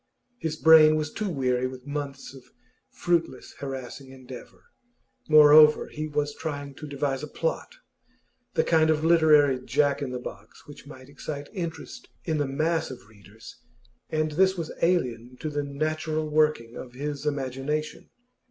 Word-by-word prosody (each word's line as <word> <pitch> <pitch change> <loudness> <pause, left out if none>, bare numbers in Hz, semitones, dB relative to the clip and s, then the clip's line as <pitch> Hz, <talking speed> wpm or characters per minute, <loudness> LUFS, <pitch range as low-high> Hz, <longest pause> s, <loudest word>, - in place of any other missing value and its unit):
His 160 -2 -3
brain 155 -1 +7
was 155 -1 -3
too 215 -2 -3
weary 130 -5 0
with 130 0 -10
months 145 -2 -6
of 135 -2 -13 0.5
fruitless, 170 -7 -2
harassing 135 -1 -7
endeavour; 130 -1 -12 0.7
moreover, 150 0 +7
he 155 0 -5
was 145 -1 -2
trying 145 -3 -6
to 150 - -8
devise 140 -2 -2
a 150 - -6
'plot,' - - -3 0.8
the - - +3
kind 160 -1 +3
of 155 0 +1
literary 150 -5 +5
Jack 145 +1 +1
in 140 - -3
the 125 - -4
box 110 -3 -10
which 145 -1 -13
might 130 -2 -12
excite 145 0 -7
interest 180 +7 -6 0.2
in 160 -3 -1
the 145 - 0
mass 160 +4 -1
of 125 -5 -11
readers, 105 +1 -15 0.5
and 155 0 -1
this 190 +4 +2
was 165 -2 -4
alien 125 -8 0
to 155 - -4
the 145 0 -1
natural 155 +2 -2
working 150 -6 +1
of 125 - -9
his 145 +2 -5
imagination. 140 +2 -3
145 Hz, 150 wpm, -26 LUFS, 135-155 Hz, 0.8 s, brain